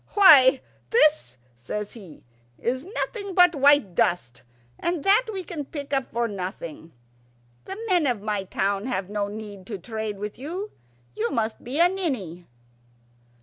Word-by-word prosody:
"Why, 275 -10 +8 0.3
this," 305 - +3 0.2
says 200 +13 -5
he, 190 -10 -13 0.3
"is 255 +3 -2
nothing 400 0 -4
but 355 -1 +6
white 280 - +4
dust, 170 -8 0 0.4
and 345 -4 -2
that 420 +5 +4
we 385 -3 -4
can 320 -4 -5
pick 285 0 -7
up 270 -1 -1
for 235 0 0
nothing. 180 -5 -7 0.7
The 385 - -7
men 355 -7 +3
of 245 -4 0
my 205 -1 -2
town 195 +3 -1
have 195 -6 -3
no 205 -1 -1
need 205 -2 -9
to 210 - -5
trade 220 +2 -5
with 210 +3 -6
you. 360 +10 -5 0.4
You 230 +2 -1
must 225 -4 -2
be 265 +6 -3
a 345 - +7
ninny." 250 - -3
235 Hz, 150 wpm, -25 LUFS, 200-320 Hz, 0.7 s, Why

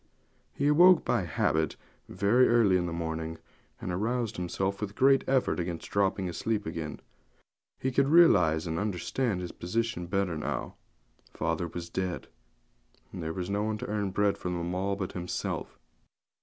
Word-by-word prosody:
He 140 - -2
awoke 175 +4 +6
by 110 -7 +1
habit 80 -1 0 0.3
very 105 +7 +3
early 115 -5 +4
in 90 -1 +1
the - - -4
morning, 80 -1 -4 0.4
and 90 - -4
aroused 115 +4 -1
himself 95 +3 -2
with 105 - -2
a - - -17
great 135 +3 +4
effort 130 -7 +1
against 85 -1 -4
dropping 95 -1 +1
asleep 105 +4 -2
again. 80 -1 -5 0.8
He 130 - -1
could 135 +2 +3
realize 90 - +5
and 80 -1 -2
understand 105 +1 -1
his 90 - -5
position 90 -1 -2
better 95 -2 0
now. - - -3 0.6
Father 85 +2 -1
was 85 +1 -6
dead; 90 0 -3 0.8
and 95 - -7
there 80 0 -3
was 90 +2 -4
no 100 +1 0
one 110 0 -1
to - - -6
earn 105 -2 -1
bread 100 +1 +1
for 90 - -3
them 85 0 -3
all 95 +2 -1
but 95 -2 -4
himself. 90 -1 -4
95 Hz, 165 wpm, -29 LUFS, 85-110 Hz, 0.8 s, awoke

